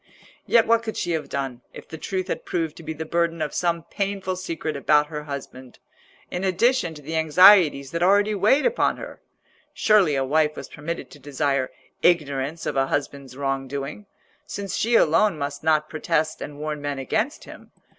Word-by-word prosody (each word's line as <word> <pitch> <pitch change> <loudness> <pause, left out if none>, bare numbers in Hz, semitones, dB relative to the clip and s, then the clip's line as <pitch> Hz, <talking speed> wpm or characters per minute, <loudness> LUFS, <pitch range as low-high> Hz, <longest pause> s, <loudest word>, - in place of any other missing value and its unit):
Yet 230 -1 +5
what 230 0 +3
could 220 -1 -5
she 175 - -2
have 160 -2 -2
done 135 -3 -4
if - - -11
the 160 - -8
truth 185 +1 -3
had - - -3
proved 165 -3 -2
to - - -10
be 160 0 -5
the 160 +1 -6
burden 170 0 0
of 155 -1 -3
some 170 -2 0
painful 195 0 -3
secret 165 -4 -4
about 150 +1 +3
her 150 0 -5
husband, 130 -3 -8 0.5
in 180 - -3
addition 190 -1 +1
to 150 - -12
the 160 +3 -5
anxieties 160 -3 +6
that 170 - -3
already 200 +3 +4
weighed 215 +9 +3
upon - - +1
her? - - -9 0.5
Surely 200 -9 +4
a 135 -1 0
wife 150 +2 +2
was - - -7
permitted 160 +3 -6
to 145 - -13
desire 140 -1 -1 0.3
ignorance 150 -2 +1
of - - -2
a 135 0 +2
husband's 140 -2 -4
wrong 135 -1 -2
doing, 140 +9 -6 0.4
since 200 -2 -5
she 235 +2 +1
alone 185 +1 +4
must 140 0 -4
not 155 -1 +2
protest 155 0 -1
and 145 - -7
warn 150 0 -4
men 145 -1 -3
against 220 - -2
him. - - -13
155 Hz, 185 wpm, -24 LUFS, 145-185 Hz, 0.5 s, anxieties